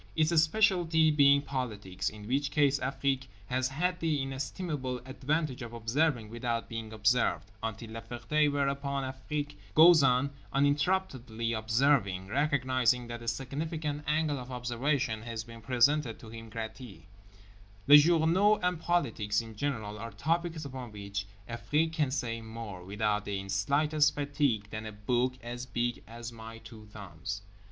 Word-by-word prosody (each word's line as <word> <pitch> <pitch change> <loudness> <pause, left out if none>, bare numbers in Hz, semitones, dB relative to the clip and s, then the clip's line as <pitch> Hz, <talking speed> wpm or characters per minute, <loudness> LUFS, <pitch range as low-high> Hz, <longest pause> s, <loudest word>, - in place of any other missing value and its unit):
Its 160 +1 +3
specialty 165 -3 +3
being 140 -1 +5
politics, 105 -9 -3
in 105 -1 -11
which 140 +3 0
case 145 -1 +3
Afrique 135 0 -1 0.2
has 130 +3 0
had 180 +7 -1
the 160 -3 0
inestimable 135 0 -3
advantage 135 +1 -2
of 120 -1 -7
observing 120 +1 0
without 115 +1 -3
being 115 -2 -6
observed—until 110 0 -1
La 115 0 -6
Ferté; 120 +6 0
whereupon 140 0 -1
Afrique 145 +3 -4 0.2
goes 165 0 +8
on 135 +1 +3 0.2
uninterruptedly 140 -6 0
observing, 110 -4 +2
recognising 130 -3 +2
that 120 0 -7
a 115 - -9
significant 145 +5 -3
angle 150 -2 +1
of 125 0 -8
observation 125 -1 -1
has 115 -1 -5
been 115 0 -12
presented 125 +1 +2
to 115 - -12
him 115 0 -9
gratis. 110 0 -7 0.8
Les 145 +1 +10
journaux 170 +6 +4
and 180 -2 +1
politics 115 -12 +1
in 115 -1 -7
general 110 -5 -3
are 115 - -5
topics 160 - -1
upon 130 -4 -7
which 100 0 -5 0.2
Afrique 150 +7 0
can 150 -4 +1
say 120 -4 -2
more, 110 -5 -8
without 105 +2 -1
the 100 -1 -3
slightest 145 +10 +2
fatigue, 140 -7 0
than 110 0 -5
a - - -6
book 120 +5 0
as 120 +1 -6
big 120 -1 -1
as 115 +1 -7
my 115 0 -9
two 110 -1 -13
thumbs. 100 -1 -7
125 Hz, 145 wpm, -30 LUFS, 115-145 Hz, 0.8 s, Les